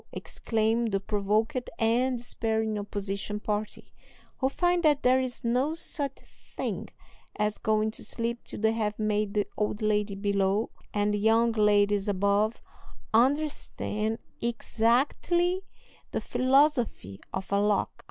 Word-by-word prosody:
exclaim 225 +1 -1
the 195 -3 0
provoked 210 +5 0
and 245 +3 +2
despairing 220 -2 -1
opposition 205 0 -4
party, 210 0 -4 0.5
who 265 - +2
find 350 +4 +1
that 300 -4 +3
there 255 +1 +5
is 255 0 -4
no 255 +7 +1
such 285 -4 -1 0.4
thing - - -3 0.5
as 210 0 -1
going 215 0 +1
to - - -10
sleep 235 +1 -3
till - - -6
they 220 +1 +3
have 215 -2 -1
made 210 -1 0
the 205 -1 +2
old 210 0 -1
lady 210 -1 0
below 200 +1 +1 0.2
and 205 0 +1
the 210 - 0
young 225 +2 +4
ladies 205 -2 +3
above 200 +3 +1 0.5
understand 235 -4 +1 0.2
exactly 270 +10 +1 0.5
the - - -1
philosophy 255 - +2
of 190 0 -5
a 200 - +3
lock. 205 -1 +2
220 Hz, 130 wpm, -28 LUFS, 205-245 Hz, 0.5 s, there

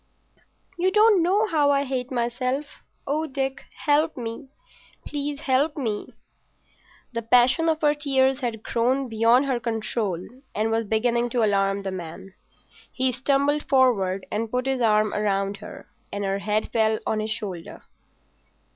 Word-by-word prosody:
"You 365 +2 +3
don't 425 -2 +5
know 390 +6 +3
how 310 -7 +2
I 280 0 +3
hate 260 -2 -3
myself. 255 +4 -2 0.2
Oh, 305 +3 -1
Dick, 270 -1 -3 0.2
help 305 +1 +2
me—help 285 - -4
me!" 225 -7 -3 1.0
The 230 - -2
passion 250 +8 +4
of 315 0 -1 0.2
tears 270 -2 +2
had 230 -4 -4
grown 255 +3 0
beyond 230 +4 +3
her 260 -3 0
control 225 -4 -2 0.4
and 220 +2 0
was 225 0 0
beginning 235 +3 +1
to 240 -1 +1
alarm 195 -1 +1
the 195 - -3
man. 185 +1 -8 0.6
He 260 0 +1
stumbled 280 +3 0
forward 205 -9 +2
and 225 +1 -2
put 250 +2 -1
his 265 -1 -1
arm 215 -2 +3
round 200 -1 0
her, 210 - -11 0.2
and 205 0 -3
her 195 0 -1
head 210 +1 -1
fell 220 -1 +2
on 215 - 0
his 215 +1 -2
shoulder. 200 -6 -5
245 Hz, 140 wpm, -24 LUFS, 215-280 Hz, 1.0 s, don't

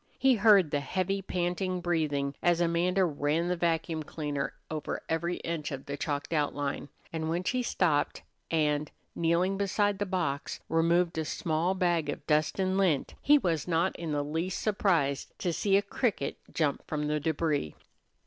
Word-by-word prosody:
He 270 -1 +5
heard 205 -7 +5
the 145 - +1
heavy, 190 +6 -1
panting 180 0 -1
breathing 155 -5 0
as 175 -1 +3
Amanda 175 +2 +2
ran 155 +2 0
the 180 - +1
vacuum 165 -1 0
cleaner 145 -2 -3 0.2
over 155 -2 -3
every 170 +2 -1
inch 160 -3 -3
of 135 -1 -6
the 140 - -4
chalked 145 +1 -3
outline, 145 -2 -1 0.2
and 160 -1 -2
when 170 +2 -1
she 250 +6 0
stopped 175 -10 +1 0.3
and, 150 -2 +1 0.2
kneeling 175 +4 +1
beside 200 0 +1
the 205 - -1
box, 165 -7 -2
removed 165 +1 +2
a 160 - -1
small 165 +4 0
bag 175 -5 +1
of - - -4
dust 150 -1 +2
and 190 0 +1
lint, 170 -8 +1
he 295 +2 +6
was 170 - -1
not 170 +2 +1
in 165 -2 -4
the 145 -1 0
least 165 +5 -2
surprised 170 -10 0
to 175 - -1
see 195 +3 +3
a 200 - +1
cricket 215 +2 -1 0.2
jump 150 -4 0
from 150 -1 -2
the 150 0 0
débris. 150 - -1
165 Hz, 170 wpm, -29 LUFS, 150-185 Hz, 0.3 s, he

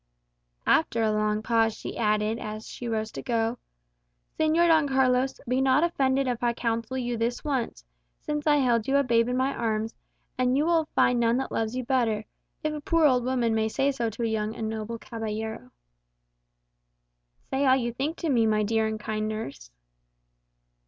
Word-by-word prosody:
After 230 -8 +2
a 215 - +2
long 215 0 0
pause 225 -1 +2
she - - -6
added, 215 0 +1
as 215 0 -6
she 240 - -7
rose 220 -1 -2
to - - -6
go, 230 -1 -1 0.8
"Señor 315 +2 +4
Don 320 -3 +4
Carlos, 260 0 +2
be 255 +2 +1
not 265 +3 +4
offended 275 -5 +1
if 245 -2 -2
I 240 -1 +1
counsel 230 +2 -2
you 245 -2 -2
this 235 +2 -2
once, 255 - -2 0.3
since 295 0 -3
I 295 - +5
held 240 -6 +2
you 275 +1 +3
a 280 - +3
babe 230 -2 +2
in 250 - 0
my 265 +2 +1
arms, 220 0 -1 0.5
and 255 +1 +2
you 295 - +2
will 330 -1 +2
find 245 -1 +3
none 235 0 +3
that 265 - -3
loves 225 +1 -1
you 255 - -2
better 230 -5 +1 0.4
if 310 0 -1
a 300 - -5
poor 330 +2 +2
old 255 -4 +4
woman 245 -2 +1
may 220 0 +1
say 275 +5 +1
so 235 -4 -2
to 225 +2 -5
a - - +2
young 220 -1 -1
and 225 -1 -3
noble 220 +1 -4
caballero." 220 - -5 1.8
"Say 270 +1 +1
all 260 - +6
you 240 -3 -1
think 285 +7 -3
to 330 - -1
me, 235 -5 +3
my 215 -1 +2
dear 220 +1 +1
and 220 0 -3
kind 215 0 -2
nurse." 215 - -6
235 Hz, 190 wpm, -27 LUFS, 220-265 Hz, 1.8 s, all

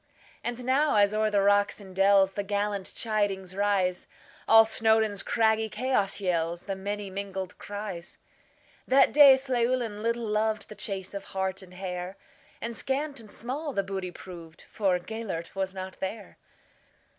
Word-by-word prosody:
And 240 +1 -4
now, 285 +2 +3
as 205 0 +4
o'er 215 0 +2
the 200 -2 +2
rocks 205 +1 +3
and 190 -2 -12
dellsThe 195 0 +3
gallant 205 -1 -1
chidings 200 -4 -2
rise, 195 -3 0 0.4
All 225 0 +8
Snowdon's 220 -2 +2
craggy 220 -1 +2
chaos 215 -3 0
yellsThe 175 0 -1
many 200 +1 -4
mingled 190 -1 -5
cries! 205 -4 -6 0.7
That 265 +1 +5
day 280 -2 +9
Llewelyn 240 -4 0
little 230 +1 -1
lovedThe 215 0 -1
chase 195 -2 -5
of 200 -1 -6
hart 190 0 -1
and 180 -1 -14
hare; 180 0 -5 0.4
And 230 0 -4
scant 280 +3 -2
and 220 -2 -13
small 275 +8 -4
the 200 - 0
booty 190 -1 -4
proved, 170 -2 -11
For 195 -4 0
Gêlert 185 -3 -6
was 190 0 -3
not 185 0 -7
there. 200 +2 -6
205 Hz, 145 wpm, -28 LUFS, 190-225 Hz, 0.7 s, day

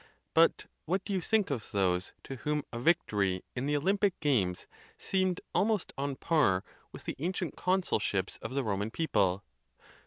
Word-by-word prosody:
But - - +4 0.2
what 190 +4 -1
do 205 - -2
you 190 - +1
think 210 -1 +1
of 120 -6 -3
those 95 -2 +1
to 135 - -6
whom 150 +2 -1
a 115 - -3
vic 170 +7 +3
tory 95 -3 0
in 130 +2 -2
the 145 0 +2
Olympic 195 +5 +1
games 110 - +1 0.3
seemed 185 -2 0
almost 210 -2 +1
on 140 +1 -1
a - - -8
par 130 - +2 0.3
with - - -10
the - - -4
ancient 180 +2 -2
consulships 110 - 0
of 130 - -6
the 140 - +1
Roman 105 -1 -1
people? 100 - +1
140 Hz, 175 wpm, -31 LUFS, -, 0.3 s, But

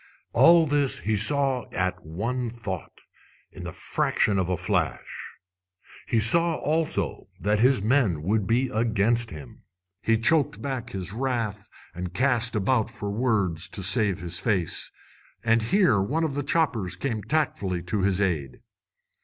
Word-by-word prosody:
All 170 -1 +6
this 145 -2 +1
he 110 0 0
saw 135 +3 +3
at 95 0 -2
one 115 +10 -3
thought, 105 -7 -7 0.5
in - - -10
the - - -5
fraction 100 -3 0
of 90 -1 -1
a 90 - 0
flash. 90 -7 -3 0.7
He 115 - +1
saw 165 +9 +7
also 155 - -1
that 105 +1 0
his 125 -2 +3
men 110 - +1
would 100 +2 0
be 125 +4 +1
against 115 +1 +1
him. 70 -5 -10 0.4
He 115 +1 +2
choked 150 +5 +1
back 135 -4 -5
his 95 -1 -6
wrath 115 -4 -3 0.2
and 90 +1 -7
cast 120 -2 +1
about 110 +2 +1
for 105 -3 -6
words 100 -8 -1
to 95 - -6
save 100 -1 +1
his 85 0 -4
face. 95 -7 -1 0.5
And 115 0 +2
here 115 - +2
one 150 +12 -1
of 155 -3 -1
his 145 0 -3
choppers 125 - 0
came 115 -6 -3
tactfully 100 - -2
to 95 +3 -2
his 95 0 +1
aid. 80 -10 -2
110 Hz, 150 wpm, -25 LUFS, 95-130 Hz, 0.7 s, saw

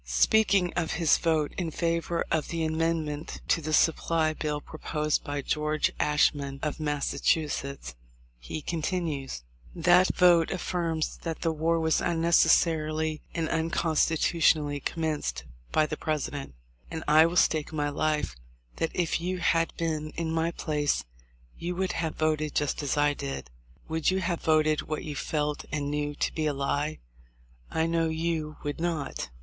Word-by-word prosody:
Speaking 190 - +3
of 170 -2 -1
his 165 -2 +3
vote 160 -3 +1
in 175 -2 -1
favor 170 +1 -1
of 160 -2 +1
the 165 -1 -2
amendment 160 -1 -1
to 165 - +3
the 155 +1 -4
supply 160 0 +2
bill 150 -1 -2
proposed 150 0 -2
by 145 -1 -3
George 150 +1 0
Ashmun, 145 -2 +2
of 150 0 -2
Massachusetts, 145 - -1 0.5
he 145 - -6
continues: 155 - -3 0.3
"That 180 +2 +5
vote 175 -2 +5
affirms 170 -4 -2
that 165 -2 -5
the 165 - +1
war 165 +1 +1
was 160 -1 +2
unnecessarily 160 -2 +2
and 165 -2 0
unconstitutionally 160 -2 +2
commenced 150 - -2 0.3
by 155 - +3
the 155 0 -4
Presi 155 -2 -2
dent; 140 - -7 0.3
and 160 - -5
I 155 +2 +7
will 170 - -4
stake 155 -3 +2
my 145 -2 -1
life 150 - -1 0.4
that 165 - 0
if 170 -2 0
you 185 +2 -2
had 165 -1 +2
been 155 -2 -2
in 165 -1 -1
my 165 +1 +1
place 150 -3 -1 0.5
you 175 +1 -3
would 190 0 0
have 160 -1 -2
voted 155 -1 0
just 150 0 0
as 145 0 -1
I 145 0 +3
did. 135 - -6 0.4
Would 160 -1 +1
you 190 +1 +1
have 170 -2 -1
voted 155 -1 +3
what 155 0 -4
you 150 -2 -5
felt 150 0 -2
and 145 -1 -2
knew 145 0 -2
to - - -1
be 155 -1 -1
a 150 - +1
lie? 145 +2 -1 0.7
I 160 - 0
know 165 0 +1
you 160 -1 -2
would 145 +1 -3
not. 160 - -2
155 Hz, 155 wpm, -28 LUFS, 150-165 Hz, 0.7 s, I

